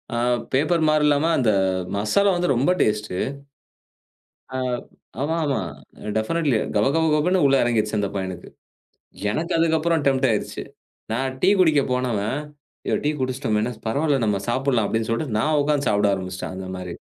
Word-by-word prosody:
ஆ, -, -, -1 dB, 0.4 s
paper 155 Hz, +5 st, +2 dB
மாரி 155 Hz, 0 st, +3 dB
இல்லாம, 145 Hz, +1 st, +3 dB
அந்த 125 Hz, -4 st, +2 dB, 0.5 s
மசாலா 110 Hz, -, +2 dB
வந்து 175 Hz, 0 st, 0 dB
ரொம்ப 135 Hz, +8 st, +2 dB
டேஸ்டு. 105 Hz, -3 st, 0 dB, 1.4 s
ஆ -, -, -2 dB, 0.6 s
ஆமா 160 Hz, +3 st, 0 dB
ஆமா. 140 Hz, -3 st, 0 dB, 0.6 s
டெஃபனட்லி. 140 Hz, +4 st, +1 dB, 0.2 s
கப 105 Hz, 0 st, +3 dB
கப 165 Hz, 0 st, +2 dB
கபன்னு 180 Hz, +4 st, +2 dB
உள்ள 135 Hz, -, +4 dB
எறங்கிருச்சு, 110 Hz, -3 st, +1 dB
அந்த 100 Hz, -1 st, 0 dB
பையனுக்கு. 95 Hz, -2 st, -5 dB, 0.8 s
எனக்கு 160 Hz, +9 st, -2 dB
அதுக்கப்பறம் 165 Hz, -1 st, +2 dB
டெம்ப்ட் 135 Hz, -1 st, +3 dB
ஆயிருச்சு. 110 Hz, -2 st, -2 dB, 0.5 s
நான் 130 Hz, +3 st, -1 dB
டீ 185 Hz, -, +5 dB
குடிக்க 155 Hz, -5 st, +5 dB
போனவேன், 125 Hz, -1 st, -1 dB, 0.5 s
யோ, -, -, +1 dB
டீ -, -, +3 dB
குடிச்சிட்டோமேன்னா! 125 Hz, -3 st, -1 dB
பரவால்ல 140 Hz, +3 st, +1 dB
நம்ம 105 Hz, -2 st, +1 dB
சாப்பட்லாம் 125 Hz, -3 st, +1 dB
அப்டின்னு 110 Hz, 0 st, -1 dB
சொல்லிட்டு 115 Hz, -2 st, -1 dB
நான் 150 Hz, +5 st, +2 dB
உக்காந்து 145 Hz, -1 st, 0 dB
சாப்பிட 105 Hz, -1 st, +2 dB
ஆரம்பிச்சுட்டேன். 95 Hz, 0 st, -6 dB
அந்த 95 Hz, 0 st, -6 dB
மாரி. 90 Hz, -2 st, -6 dB
130 Hz, 150 wpm, -23 LUFS, 105-150 Hz, 1.4 s, டீ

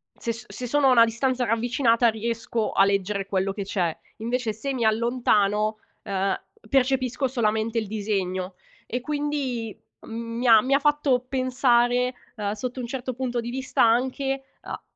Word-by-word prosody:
se 230 Hz, -, -3 dB
s 225 Hz, +1 st, -11 dB
se 250 Hz, -, -5 dB
sono 290 Hz, +2 st, +3 dB
a -, -, +6 dB
una 235 Hz, -2 st, +7 dB
distanza 250 Hz, +2 st, 0 dB
ravvicinata 235 Hz, +1 st, +2 dB
riesco 225 Hz, 0 st, -2 dB
a 195 Hz, -, +5 dB
leggere 200 Hz, 0 st, 0 dB
quello 195 Hz, 0 st, -1 dB
che 200 Hz, -, -4 dB
c'è, 180 Hz, -4 st, -1 dB, 0.2 s
invece 230 Hz, 0 st, -2 dB
se 275 Hz, +6 st, -4 dB
mi 235 Hz, -3 st, 0 dB
allontano, 215 Hz, -2 st, +2 dB, 0.2 s
ehm, 195 Hz, -1 st, -1 dB, 0.3 s
percepisco 265 Hz, 0 st, +1 dB
solamente 225 Hz, -2 st, 0 dB
il 220 Hz, -3 st, -1 dB
disegno 195 Hz, -3 st, -2 dB, 0.3 s
e 245 Hz, +2 st, -3 dB
quindi, 285 Hz, -6 st, -2 dB, 0.2 s
mhmm, 230 Hz, 0 st, -6 dB
mi 245 Hz, -, 0 dB
ha 225 Hz, -2 st, +8 dB
mi 265 Hz, +4 st, 0 dB
ha 275 Hz, -, +5 dB
fatto 295 Hz, -3 st, +2 dB
pensare, 250 Hz, -1 st, +2 dB, 0.2 s
uhm, 205 Hz, -1 st, -2 dB
sotto 250 Hz, +4 st, -5 dB
un 240 Hz, -, -4 dB
certo 255 Hz, 0 st, -4 dB
punto 245 Hz, -2 st, -2 dB
di 235 Hz, -, -5 dB
vista 260 Hz, +2 st, 0 dB
anche 265 Hz, +3 st, +1 dB, 0.2 s
a -, -, -7 dB
235 Hz, 165 wpm, -25 LUFS, 215-255 Hz, 0.3 s, ha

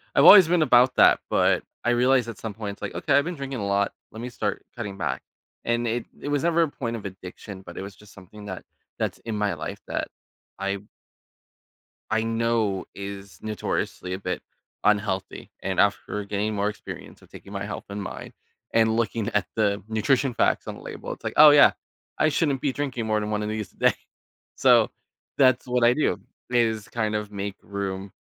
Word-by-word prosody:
I've -, -, +6 dB
always 190 Hz, -5 st, +11 dB
been 175 Hz, -1 st, +3 dB
about 125 Hz, -1 st, +5 dB
that, -, -, +6 dB
but -, -, +3 dB, 0.2 s
I 120 Hz, -, +2 dB
realized 125 Hz, 0 st, +3 dB
at 110 Hz, -, -7 dB
some 110 Hz, -2 st, -5 dB
point, 105 Hz, -2 st, -5 dB
it's -, -, -30 dB
like, -, -, -5 dB
"Okay, 145 Hz, -, 0 dB
I've 145 Hz, -, +3 dB
been 175 Hz, 0 st, -3 dB
drinking 135 Hz, -3 st, -5 dB
a 100 Hz, -, -2 dB
lot. 100 Hz, 0 st, +1 dB, 0.2 s
Let 110 Hz, -, -8 dB
me 125 Hz, -, -4 dB
start 105 Hz, -3 st, -3 dB
cutting 105 Hz, -5 st, -5 dB
back." 65 Hz, -7 st, -2 dB, 0.4 s
And 120 Hz, 0 st, +1 dB
it 115 Hz, +1 st, -1 dB, 0.2 s
it -, -, -6 dB
was 145 Hz, +1 st, 0 dB
never 170 Hz, 0 st, +3 dB
a -, -, +1 dB
point 115 Hz, -2 st, -4 dB
of 105 Hz, -, -7 dB
addiction, 95 Hz, +1 st, -9 dB
but 85 Hz, -1 st, -11 dB
it -, -, -4 dB
was 100 Hz, 0 st, -9 dB
just 105 Hz, -1 st, -17 dB
something 100 Hz, +2 st, -13 dB
that 95 Hz, -2 st, -7 dB, 0.3 s
that's -, -, -2 dB
in 110 Hz, -2 st, -4 dB
my 105 Hz, -1 st, +1 dB
life -, -, -6 dB
that -, -, -2 dB, 0.5 s
I 100 Hz, 0 st, -1 dB, 1.3 s
I 110 Hz, 0 st, +2 dB
know 115 Hz, -3 st, 0 dB
is 100 Hz, -1 st, -8 dB
notoriously 105 Hz, -3 st, -3 dB
a 95 Hz, -, -2 dB
bit 90 Hz, -2 st, -4 dB, 0.4 s
unhealthy. 100 Hz, -2 st, 0 dB
And -, -, 0 dB
after 105 Hz, -1 st, +1 dB
getting 105 Hz, +1 st, -2 dB
more 100 Hz, +1 st, +1 dB
experience 105 Hz, -, -8 dB
of -, -, -19 dB
taking 100 Hz, -, -12 dB
my 100 Hz, 0 st, -3 dB
health 100 Hz, -, -6 dB
and 100 Hz, 0 st, -5 dB
mind -, -, -7 dB, 0.4 s
and 110 Hz, -1 st, +3 dB
looking 115 Hz, -1 st, -1 dB
at 100 Hz, -6 st, +1 dB
the 100 Hz, -2 st, +1 dB
nutrition 125 Hz, +4 st, +1 dB
facts -, -, +1 dB
on -, -, -5 dB
the -, -, -12 dB
label, -, -, -7 dB
it's -, -, -10 dB
like, -, -, -2 dB
"Oh, 150 Hz, 0 st, +10 dB
yeah, 145 Hz, -, +8 dB, 0.5 s
I 155 Hz, -, +4 dB
shouldn't 145 Hz, -3 st, +1 dB
be 140 Hz, -, 0 dB
drinking 130 Hz, -6 st, -3 dB
more 110 Hz, 0 st, +1 dB
than 105 Hz, 0 st, -3 dB
one 105 Hz, 0 st, -1 dB
of 105 Hz, -, -2 dB
these 110 Hz, -2 st, -4 dB
a -, -, -29 dB
day." -, -, +4 dB, 0.6 s
So -, -, +5 dB, 0.5 s
that's 130 Hz, -2 st, +4 dB
what 125 Hz, -1 st, +1 dB
I 120 Hz, -, +6 dB
do, 150 Hz, -8 st, +1 dB, 0.3 s
is 115 Hz, -3 st, +1 dB
kind 110 Hz, -2 st, -1 dB
of 105 Hz, -1 st, -2 dB
make 100 Hz, -1 st, -4 dB
room 100 Hz, -1 st, -4 dB
110 Hz, 205 wpm, -25 LUFS, 100-120 Hz, 1.3 s, always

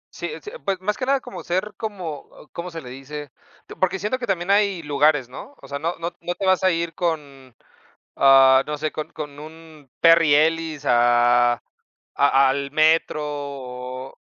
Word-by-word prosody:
Sí, -, -, -4 dB
eh, -, -, -7 dB
sí, 420 Hz, -, -8 dB
pues, 195 Hz, -2 st, -1 dB
más 205 Hz, +3 st, -1 dB
que 255 Hz, -, -4 dB
nada, 275 Hz, 0 st, +2 dB
como 245 Hz, -, -9 dB
ser 190 Hz, +4 st, -2 dB
como, 185 Hz, -10 st, -6 dB, 0.2 s
¿cómo 170 Hz, +1 st, -6 dB
se 165 Hz, -1 st, -7 dB
le 125 Hz, -, -9 dB
dice? 140 Hz, +2 st, -8 dB, 0.4 s
Eh, -, -, -10 dB
porque 185 Hz, 0 st, +1 dB
siento 210 Hz, +7 st, -2 dB
que 240 Hz, -, -5 dB
también 180 Hz, -1 st, -1 dB
hay 200 Hz, -4 st, +2 dB
lugares, 145 Hz, -2 st, +2 dB
¿no? 140 Hz, -, -11 dB
O -, -, -14 dB
sea, 140 Hz, +1 st, -5 dB
no 165 Hz, +4 st, -2 dB
no 170 Hz, +1 st, -4 dB
no 175 Hz, +1 st, -3 dB
te 195 Hz, -, -4 dB
vas 185 Hz, 0 st, +3 dB
a 190 Hz, -, +5 dB
ir 170 Hz, -1 st, -2 dB
con, 140 Hz, -7 st, -4 dB, 0.6 s
ah 135 Hz, -1 st, +6 dB
no 150 Hz, 0 st, -4 dB
sé, 155 Hz, +1 st, -2 dB
con 155 Hz, -, -6 dB
con 145 Hz, -1 st, -8 dB
un 155 Hz, -2 st, -13 dB
Perry 165 Hz, -3 st, +6 dB
Ellis 160 Hz, -1 st, +1 dB
a, 120 Hz, 0 st, +4 dB, 0.4 s
a 140 Hz, -1 st, +2 dB
al 140 Hz, +1 st, -2 dB
metro, 155 Hz, +1 st, +3 dB
o, 130 Hz, -3 st, -7 dB
155 Hz, 190 wpm, -22 LUFS, 135-175 Hz, 0.6 s, ah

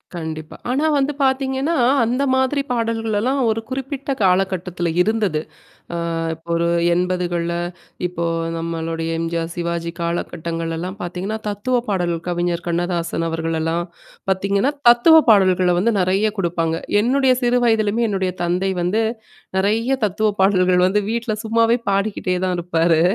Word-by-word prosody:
கண்டிப்பா. 160 Hz, -1 st, -6 dB, 0.2 s
ஆனா 280 Hz, +5 st, +1 dB
வந்து 280 Hz, +1 st, +1 dB
பார்த்தீங்கன்னா, 265 Hz, +3 st, 0 dB, 0.3 s
அந்த 250 Hz, +5 st, 0 dB
மாதிரி 260 Hz, +2 st, +1 dB
பாடல்கள்லாம் 230 Hz, +2 st, 0 dB
ஒரு 220 Hz, +1 st, 0 dB
குறிப்பிட்ட 270 Hz, +1 st, -4 dB
காலகட்டத்தில 180 Hz, -2 st, +1 dB
இருந்தது. 205 Hz, -6 st, +1 dB, 0.6 s
அ -, -, -1 dB, 0.4 s
இப்போ 165 Hz, +1 st, -22 dB
ஒரு 170 Hz, 0 st, +1 dB, 0.3 s
80கள்ல 175 Hz, -1 st, -1 dB, 0.5 s
இப்போ 170 Hz, -1 st, -4 dB, 0.3 s
நம்மளுடைய 165 Hz, 0 st, -3 dB
எம்ஜிஆர், 165 Hz, 0 st, -2 dB
சிவாஜி 170 Hz, -1 st, -3 dB
காலகட்டங்கள்லல்லாம் 170 Hz, +1 st, -3 dB
பார்த்தீங்கன்னா, 185 Hz, +5 st, -4 dB
தத்துவ 205 Hz, +5 st, -1 dB
பாடல் 175 Hz, -4 st, 0 dB
கவிஞர் 175 Hz, 0 st, -1 dB
கண்ணதாசன் 170 Hz, -1 st, -1 dB
அவர்கள்லாம், 165 Hz, +1 st, -1 dB, 0.4 s
பார்த்தீங்கன்னா, 200 Hz, +7 st, +1 dB, 0.2 s
தத்துவ 240 Hz, +7 st, +7 dB
பாடல்கள 185 Hz, -3 st, +4 dB
வந்து 225 Hz, +6 st, +2 dB
நெறைய 190 Hz, +4 st, +2 dB
குடுப்பாங்க. 165 Hz, -3 st, 0 dB, 0.3 s
என்னுடைய 260 Hz, +2 st, +3 dB
சிறு 245 Hz, 0 st, +3 dB
வயதலயமே 225 Hz, 0 st, +2 dB
என்னுடைய 190 Hz, -2 st, -1 dB
தந்தை 180 Hz, +3 st, 0 dB
வந்து 195 Hz, +6 st, +1 dB, 0.6 s
நெறைய 220 Hz, +6 st, +1 dB
தத்துவ 215 Hz, +2 st, +1 dB
பாடல்கள் 185 Hz, -2 st, +4 dB
வந்து 200 Hz, +3 st, +2 dB
வீட்ல 235 Hz, 0 st, -1 dB
சும்மாவே 230 Hz, +1 st, +3 dB
பாடிக்கிட்டே 195 Hz, -2 st, 0 dB
தான் 185 Hz, -1 st, 0 dB
இருப்பாரு. 165 Hz, -1 st, +2 dB
185 Hz, 120 wpm, -20 LUFS, 170-225 Hz, 0.6 s, தத்துவ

